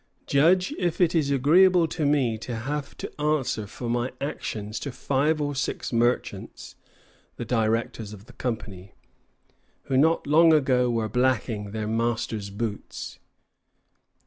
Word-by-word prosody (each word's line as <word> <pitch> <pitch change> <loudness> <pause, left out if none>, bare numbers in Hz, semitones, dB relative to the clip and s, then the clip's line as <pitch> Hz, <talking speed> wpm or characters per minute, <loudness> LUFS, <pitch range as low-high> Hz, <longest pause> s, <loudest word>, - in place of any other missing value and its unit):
Judge 180 - +3
if 175 -3 -1
it 175 -3 +3
is 155 -5 +1
agreeable 170 +6 +5
to 155 -2 -1
me 135 -6 +2
to 115 +2 -6
have 140 +5 -4
to - - -7
answer 145 -8 0
for 120 +4 -7
my 120 +2 -1
actions 110 -6 -4
to 140 - -5
five 140 +5 0
or 145 -1 -1
six 135 -1 -3
merchants 120 +1 -1 0.6
[the - - -5
directors 115 -2 -1
of 105 -1 -11
the 125 - -16
company], 100 -6 -5 0.9
who 135 - -2
not 160 +4 +3
long 160 +3 +6
ago 130 -4 +3
were 115 -2 0
blacking 115 -4 0
their 110 +1 -4
masters' 115 -2 -1
boots." 105 +1 -5
125 Hz, 140 wpm, -25 LUFS, 110-150 Hz, 0.9 s, long